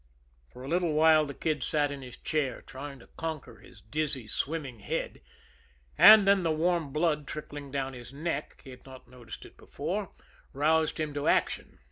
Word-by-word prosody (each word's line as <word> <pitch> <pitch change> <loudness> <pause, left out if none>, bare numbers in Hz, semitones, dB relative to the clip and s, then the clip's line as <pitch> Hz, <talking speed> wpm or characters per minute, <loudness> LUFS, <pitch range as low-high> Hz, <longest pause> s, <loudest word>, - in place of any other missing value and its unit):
For 125 - -11
a - - -7
little 170 +1 +1
while 155 0 +5
the 140 - -7
Kid 155 -3 -1
sat 145 +2 +1
in 140 -1 -6
his 125 -2 -10
chair, 140 -5 -2
trying 140 +1 -8
to - - -17
conquer 155 -8 -5
his - - -17
dizzy, 140 0 -2
swimming 130 +3 -3
head; - - -4 0.7
and 215 -2 +9
then 200 -1 +5
the 170 - 0
warm 165 -1 0
blood 150 -1 0
trickling 145 -1 -7
down 135 -1 -3
his 120 0 -10
neck 150 +1 -4
he 135 - -11
had 125 - -13
not 130 -2 -13
noticed 120 -2 -11
it - - -16
before - - -4 0.4
roused 155 +3 +2
him 155 -2 -2
to 145 0 -2
action. - - 0
145 Hz, 180 wpm, -29 LUFS, 130-160 Hz, 0.7 s, and